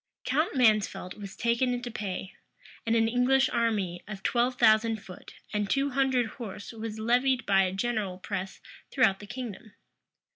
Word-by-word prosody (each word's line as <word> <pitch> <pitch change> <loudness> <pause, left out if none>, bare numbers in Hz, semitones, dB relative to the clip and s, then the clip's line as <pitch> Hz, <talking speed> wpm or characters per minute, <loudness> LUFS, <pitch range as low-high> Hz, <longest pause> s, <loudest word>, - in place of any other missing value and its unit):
Count 290 +5 +1
Mansfeldt 215 -6 +2
was 200 -2 -9
taken 240 +2 +1
into 245 0 -5
pay; 195 -3 -5 0.5
and 225 - +3
an 225 0 +3
English 250 +3 +3
army 200 -7 0
of 195 -2 -8
twelve 245 +1 +1
thousand 220 -1 +4
foot 180 - -12 0.2
and 210 -1 -1
two 275 +3 +1
hundred 260 -2 +2
horse 210 -2 -8
was 225 -1 -6
levied 250 +3 +2
by 195 -1 +4
a 185 -1 +1
general 200 -2 -2
press 190 0 -5 0.3
throughout 220 -8 +3
the 205 - -10
kingdom. 230 -3 -7
225 Hz, 155 wpm, -28 LUFS, 200-250 Hz, 0.5 s, thousand